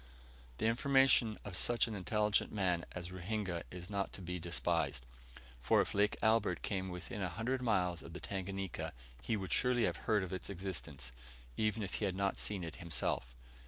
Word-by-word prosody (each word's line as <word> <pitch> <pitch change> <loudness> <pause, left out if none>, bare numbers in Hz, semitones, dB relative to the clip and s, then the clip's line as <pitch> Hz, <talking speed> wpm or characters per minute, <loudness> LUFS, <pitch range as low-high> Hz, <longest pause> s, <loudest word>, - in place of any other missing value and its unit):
The - - -1
information 125 -1 +4
of 100 -3 -4
such 120 +6 +4
an 115 - -4
intelligent 105 +1 +1
man 90 -5 +1
as 90 0 -5
Ruhinga 95 -1 -2
is 90 -1 -7
not 100 -1 -1
to - - -7
be 90 +1 -3
despised; 80 -6 0 0.6
for, - - +4
if - - +1
Lake 105 +1 +3
Albert 110 -6 +3
came 95 -2 -1
within 90 +4 -5
a 90 - 0
hundred 120 +9 -1
miles 90 -8 +1
of 85 - -10
the 90 - -5
Tanganika, 95 -1 -3 0.3
he 115 - 0
would 95 -2 -2
surely 125 -2 +4
have - - +1
heard 105 -3 +4
of 95 - -5
its 95 - -3
existence, 85 -8 -5 0.4
even 110 0 +1
if 95 - -5
he - - +2
had 95 -2 -1
not 100 0 0
seen 100 -4 0
it 80 -2 -5
himself. 65 -7 -1
95 Hz, 185 wpm, -36 LUFS, 90-110 Hz, 0.6 s, information